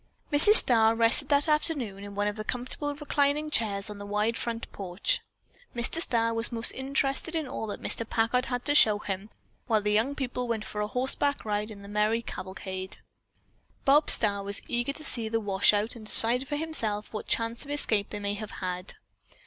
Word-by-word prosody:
Mrs. 415 +9 +11
Starr 225 - +8
rested 230 +5 +4
that 285 0 +3
afternoon 280 - -2
in 200 0 -10
one 205 0 -1
of 205 - -3
the 215 - -6
comfortable 255 +5 -4
reclining 295 +1 -1
chairs 200 -6 -1
on 210 -1 -7
the 205 - -8
wide 210 +3 -1
front 230 0 -5
porch. 195 - -3 0.5
Mr. 240 +7 -1
Starr 230 -6 0
was 225 +2 -2
most 230 0 -1
interested 275 +4 -3
in 315 -3 -3
all 235 -4 -6
that 205 - -7
Mr. 230 - -2
Packard 235 +3 0
had 245 -1 -4
to 290 - +1
show 215 -8 +4
him, 195 0 -6 0.4
while 220 -3 +2
the 210 0 -2
young 225 +7 0
people 250 -2 -4
went 220 -2 -3
for 210 - -6
a 210 - -2
horseback 265 +4 -2
ride 210 0 -3
in 205 -2 -11
merry 215 +2 0
cavalcade. 190 -1 -7 0.9
Bob 290 +2 +3
Starr 200 -2 +4
was 200 +1 -3
eager 240 +2 -2
to 310 - -7
see 230 -6 0
the 225 0 -1
washout, 205 +2 +1
and 220 -2 -11
decide 245 +5 +1
for 295 - -4
himself 225 -11 -1
what 215 - -7
chance 230 +1 -1
of 285 - -12
escape 220 -8 -1
they 210 - -7
might 205 0 -4
have 215 -1 -7
had. 180 0 -3
230 Hz, 195 wpm, -27 LUFS, 210-270 Hz, 0.9 s, Mrs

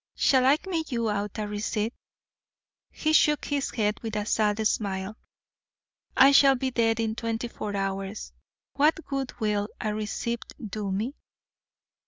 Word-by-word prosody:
'Shall 260 -1 +4
I 280 +3 +6
make 325 -5 -2
you 230 -3 0
out 205 0 -3
a 210 -1 -2
receipt?' 210 +2 -2 1.0
He 310 0 -1
shook 300 -1 +4
his 285 -2 -1
head 210 -2 -1
with 225 -2 -4
a 210 -1 -1
sad 215 0 +2
smile. 195 -1 -2 1.0
'I 270 +1 +8
shall 275 -1 +6
be 260 0 -2
dead 225 -2 +1
in 225 -1 0
twenty 230 +1 -3
four 210 -3 -5
hours. 195 +1 -3 0.4
What 310 +3 +2
good 275 -2 -4
will 210 -2 0
a 215 -1 -2
receipt 215 +2 -3 0.3
do 205 -2 -3
me?' 215 +8 -2
220 Hz, 150 wpm, -27 LUFS, 210-265 Hz, 1.0 s, I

